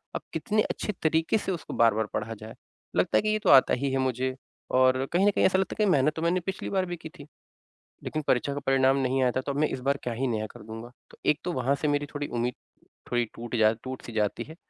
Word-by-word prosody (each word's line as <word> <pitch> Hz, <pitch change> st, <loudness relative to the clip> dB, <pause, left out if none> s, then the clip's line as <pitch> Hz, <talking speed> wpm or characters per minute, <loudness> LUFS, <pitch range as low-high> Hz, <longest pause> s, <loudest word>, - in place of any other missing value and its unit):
अब -, -, -2 dB
कितने 215 Hz, -2 st, +1 dB
अच्छे -, -, -3 dB
तरीके 160 Hz, +6 st, +2 dB
से 195 Hz, -, -3 dB
उसको 170 Hz, -, -5 dB
बार-बार 110 Hz, -2 st, +3 dB
पढ़ा 110 Hz, +2 st, -2 dB
जाए? 110 Hz, +1 st, -10 dB, 0.4 s
लगता -, -, +3 dB
है -, -, +4 dB
कि 215 Hz, -, -1 dB
ये 215 Hz, 0 st, +1 dB
तो 205 Hz, -, 0 dB
आता 135 Hz, -2 st, +7 dB
ही 135 Hz, +2 st, 0 dB
है 135 Hz, -, +1 dB
मुझे 130 Hz, 0 st, -1 dB, 0.4 s
और 130 Hz, +1 st, +4 dB
कहीं 185 Hz, +3 st, +4 dB
न -, -, +5 dB
कहीं -, -, +2 dB
ऐसा 190 Hz, -, +4 dB
लगता 190 Hz, -, -1 dB
है -, -, -9 dB
कि 215 Hz, -, +2 dB
कहीं 200 Hz, -, +3 dB
मेहनत 150 Hz, -1 st, +3 dB
तो 160 Hz, -, -4 dB
मैंने 170 Hz, +2 st, +2 dB
पिछली 190 Hz, +2 st, -4 dB
बार 190 Hz, -1 st, +1 dB
भी 175 Hz, 0 st, -4 dB
की 160 Hz, -1 st, -9 dB
थी 145 Hz, -, -13 dB, 0.8 s
लेकिन 155 Hz, -, -3 dB
परीक्षा 135 Hz, +3 st, +2 dB
का 145 Hz, -, -3 dB
परिणाम 135 Hz, 0 st, +4 dB
नहीं 130 Hz, 0 st, +1 dB
आया 125 Hz, -1 st, +3 dB
था। 130 Hz, -, -1 dB
तो 140 Hz, -, -3 dB
अब 140 Hz, -, -4 dB
मैं 155 Hz, -, +3 dB
इस -, -, -4 dB
बार 140 Hz, +2 st, +1 dB
क्या 120 Hz, -, -2 dB
ही 130 Hz, +3 st, -1 dB
नया 110 Hz, -2 st, -1 dB
कर -, -, -13 dB
दूँगा? 115 Hz, +2 st, -8 dB, 0.2 s
तो -, -, -17 dB
एक 150 Hz, -, +3 dB
तो 180 Hz, -, -2 dB
वहाँ 130 Hz, +2 st, +1 dB
से 150 Hz, -, +1 dB
मेरी 145 Hz, 0 st, +1 dB
थोड़ी 145 Hz, -1 st, -3 dB
उम्मीद 120 Hz, +1 st, -1 dB, 0.6 s
थोड़ी 120 Hz, -1 st, +2 dB
टूट 120 Hz, +1 st, -5 dB
जा 110 Hz, -1 st, +5 dB
टूट 130 Hz, 0 st, -6 dB
सी 120 Hz, -, -7 dB
जाती 105 Hz, -2 st, 0 dB
है। 160 Hz, -, -12 dB
135 Hz, 275 wpm, -27 LUFS, 120-160 Hz, 0.8 s, आता